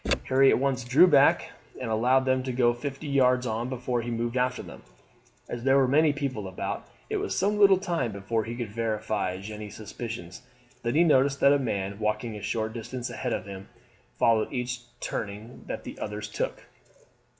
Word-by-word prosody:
Harry 135 Hz, +1 st, +6 dB
at -, -, +4 dB
once 130 Hz, -1 st, 0 dB
drew 135 Hz, +9 st, +6 dB
back 145 Hz, -5 st, +4 dB, 0.3 s
and 125 Hz, -3 st, -3 dB
allowed 125 Hz, +4 st, +3 dB
them 130 Hz, 0 st, +2 dB
to 130 Hz, 0 st, -3 dB
go 120 Hz, -1 st, +3 dB
fifty 135 Hz, +5 st, -6 dB
yards 130 Hz, -3 st, +3 dB
on 115 Hz, +1 st, -2 dB
before 125 Hz, -1 st, -2 dB
he 120 Hz, -, -5 dB
moved 120 Hz, +1 st, -2 dB
after 125 Hz, 0 st, 0 dB
them. -, -, -11 dB, 0.7 s
As 120 Hz, -1 st, -5 dB
there 135 Hz, +1 st, +4 dB
were 135 Hz, -2 st, +4 dB
many 150 Hz, +4 st, +4 dB
people 135 Hz, -8 st, -3 dB
about, 95 Hz, -, -4 dB, 0.2 s
it -, -, -1 dB
was -, -, -2 dB
some 205 Hz, +2 st, +1 dB
little 195 Hz, -2 st, +7 dB
time 170 Hz, -10 st, -1 dB
before 105 Hz, +3 st, -2 dB
he 115 Hz, +1 st, -5 dB
could 120 Hz, -4 st, -5 dB
verify 110 Hz, -4 st, -2 dB
Jeanne's 105 Hz, 0 st, -8 dB
suspicions; 110 Hz, -4 st, -7 dB, 0.4 s
then 120 Hz, +3 st, -1 dB
he 165 Hz, -, +6 dB
noticed 140 Hz, -3 st, +3 dB
that 140 Hz, -, +6 dB
a 145 Hz, -, +3 dB
man, 100 Hz, -5 st, -2 dB
walking 105 Hz, +1 st, -1 dB
a 105 Hz, -, -7 dB
short 110 Hz, 0 st, -2 dB
distance 120 Hz, +1 st, -5 dB
ahead 125 Hz, -, -3 dB
of -, -, -2 dB
him, 95 Hz, -1 st, -9 dB, 0.5 s
followed 115 Hz, -2 st, +3 dB
each 125 Hz, -1 st, -3 dB, 0.2 s
turning 105 Hz, +3 st, -5 dB
that -, -, -5 dB
the -, -, -9 dB
others 105 Hz, 0 st, -4 dB
took. -, -, -4 dB
120 Hz, 190 wpm, -27 LUFS, 110-135 Hz, 0.7 s, little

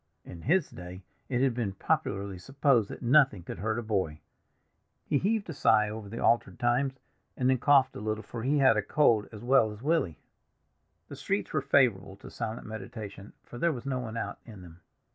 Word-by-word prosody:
In 85 Hz, -, -10 dB
his 165 Hz, -, +2 dB
day 90 Hz, +1 st, -9 dB, 0.3 s
it 125 Hz, -2 st, 0 dB
had 135 Hz, -2 st, +3 dB
been 115 Hz, -5 st, -2 dB
popularly 100 Hz, 0 st, -2 dB
supposed 135 Hz, -1 st, +1 dB
that -, -, -8 dB
nothing 130 Hz, -, +4 dB
could -, -, -7 dB
hurt 110 Hz, +3 st, -1 dB
a 120 Hz, -, -3 dB
boy. 95 Hz, -8 st, -1 dB, 0.9 s
He 140 Hz, -, +1 dB
heaved 210 Hz, +4 st, 0 dB
a -, -, -6 dB
sigh 110 Hz, -6 st, +3 dB
over 110 Hz, -2 st, -7 dB
the 115 Hz, -, -7 dB
altered 115 Hz, -7 st, +1 dB
times, 130 Hz, +3 st, +1 dB, 0.4 s
and 125 Hz, -, +1 dB
then 130 Hz, -1 st, +3 dB
coughed 135 Hz, -1 st, +4 dB
a -, -, -6 dB
little, 110 Hz, +1 st, -3 dB
for 115 Hz, -, -7 dB
he 140 Hz, +5 st, +1 dB
had 135 Hz, -5 st, +5 dB
a -, -, +2 dB
cold 110 Hz, -3 st, +2 dB
as 110 Hz, 0 st, -10 dB
well 125 Hz, -3 st, +4 dB
as 105 Hz, +3 st, -11 dB
Willy. 150 Hz, -, +1 dB, 0.9 s
The -, -, -9 dB
streets 195 Hz, +9 st, -2 dB
were 155 Hz, -, +1 dB
favorable 115 Hz, -9 st, +2 dB
to -, -, -13 dB
silent 110 Hz, +2 st, -5 dB
meditation, 110 Hz, -2 st, -8 dB
for 120 Hz, -, -10 dB
there 170 Hz, +3 st, +2 dB
was 130 Hz, -3 st, -6 dB
no 130 Hz, -2 st, -1 dB
one 115 Hz, -2 st, -5 dB
out -, -, -4 dB
in 105 Hz, -6 st, -12 dB
them. 85 Hz, 0 st, -14 dB
115 Hz, 200 wpm, -29 LUFS, 105-135 Hz, 0.9 s, had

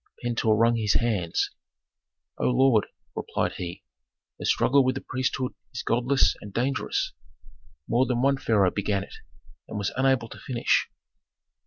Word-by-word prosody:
Pentuer 115 Hz, -2 st, +2 dB
wrung 115 Hz, +1 st, +3 dB
his 105 Hz, -3 st, +1 dB
hands. 100 Hz, -8 st, 0 dB, 0.9 s
"O -, -, 0 dB
lord," 125 Hz, -3 st, +4 dB, 0.3 s
replied -, -, -1 dB
he, 85 Hz, -1 st, -6 dB, 0.6 s
"a -, -, -3 dB
struggle 140 Hz, +1 st, +4 dB
with 130 Hz, 0 st, +1 dB
the 135 Hz, -, -4 dB
priesthood 130 Hz, 0 st, -2 dB, 0.2 s
is 115 Hz, -, -3 dB
godless 125 Hz, +4 st, +2 dB
and 105 Hz, -, -9 dB
dangerous. 125 Hz, +6 st, -1 dB, 0.7 s
More 125 Hz, +2 st, +2 dB
than 125 Hz, 0 st, 0 dB
one 140 Hz, 0 st, +3 dB
pharaoh 105 Hz, -8 st, +2 dB
began 100 Hz, -1 st, -1 dB
it, -, -, -13 dB, 0.5 s
and -, -, -6 dB
was 100 Hz, -1 st, -1 dB
unable 130 Hz, -3 st, +2 dB
to -, -, -10 dB
finish." 120 Hz, -3 st, +1 dB
120 Hz, 145 wpm, -26 LUFS, 105-130 Hz, 0.9 s, lord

